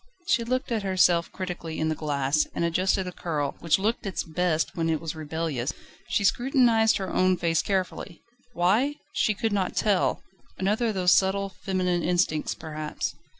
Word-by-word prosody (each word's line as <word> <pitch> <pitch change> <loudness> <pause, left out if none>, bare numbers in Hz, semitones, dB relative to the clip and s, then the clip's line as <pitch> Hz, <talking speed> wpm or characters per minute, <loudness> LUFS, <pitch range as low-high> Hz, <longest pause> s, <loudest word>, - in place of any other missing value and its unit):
She 235 - +3
looked 255 +2 -2
at 225 -2 0
herself 180 -3 +2
critically 175 -3 -5
in 160 - +1
the - - +1
glass, 145 -1 0
and 170 - 0
adjusted 185 +3 +1
a 180 - -5
curl, 150 -5 -3
which 165 - +2
looked 215 +2 -1
its 190 - -2
best 165 +1 -1
when 165 -2 0
it 160 -1 +1
was 160 -2 -4
rebellious. 155 -4 -3 0.3
She 200 - 0
scrutinised 240 -1 +3
her 190 -2 -4
own 185 0 +3
face 165 -1 +1
carefully; 185 -3 -3 0.3
why? 220 +12 +2 0.2
she 215 - +1
could 225 +1 -1
not 190 -2 -1
tell: 205 -4 +1 0.3
another 210 +5 +1
of 220 - -1
those 180 -1 +3
subtle 195 +2 +3
feminine 185 -2 -1
instincts 175 -3 0
perhaps. 155 -1 -4
180 Hz, 170 wpm, -26 LUFS, 160-200 Hz, 0.3 s, She